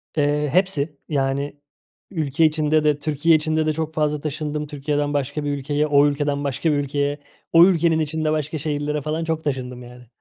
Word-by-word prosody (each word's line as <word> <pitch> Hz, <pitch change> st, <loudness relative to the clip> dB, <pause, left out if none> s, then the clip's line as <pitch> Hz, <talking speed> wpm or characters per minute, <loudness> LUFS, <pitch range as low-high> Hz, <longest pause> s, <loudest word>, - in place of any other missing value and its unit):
Eee, 150 Hz, 0 st, +1 dB
hepsi. 160 Hz, -4 st, +1 dB
Yani 140 Hz, 0 st, -1 dB, 0.5 s
ülke 160 Hz, -3 st, +1 dB
içinde 155 Hz, 0 st, +2 dB
de, 150 Hz, -1 st, +2 dB
Türkiye 155 Hz, +2 st, +2 dB
içinde 155 Hz, 0 st, +1 dB
de 155 Hz, -, +1 dB
çok 160 Hz, 0 st, -3 dB
fazla 150 Hz, -1 st, 0 dB
taşındım. 150 Hz, 0 st, -3 dB
Türkiye'den 145 Hz, 0 st, -2 dB
başka 145 Hz, +1 st, -2 dB
bir 145 Hz, -, -1 dB
ülkeye, 145 Hz, +2 st, -1 dB
o 145 Hz, -1 st, +5 dB
ülkeden 145 Hz, 0 st, -1 dB
başka 140 Hz, +3 st, 0 dB
bir 145 Hz, -, +1 dB
ülkeye. 145 Hz, +1 st, -1 dB, 0.3 s
O 165 Hz, +1 st, +9 dB
ülkenin 170 Hz, -3 st, +3 dB
içinde 155 Hz, 0 st, -1 dB
başka 155 Hz, 0 st, -2 dB
şehirlere 150 Hz, 0 st, -2 dB
falan 155 Hz, +3 st, -2 dB
çok 160 Hz, -1 st, -2 dB
taşındım 125 Hz, -3 st, -4 dB
yani. 125 Hz, 0 st, -13 dB
150 Hz, 175 wpm, -22 LUFS, 145-155 Hz, 0.5 s, O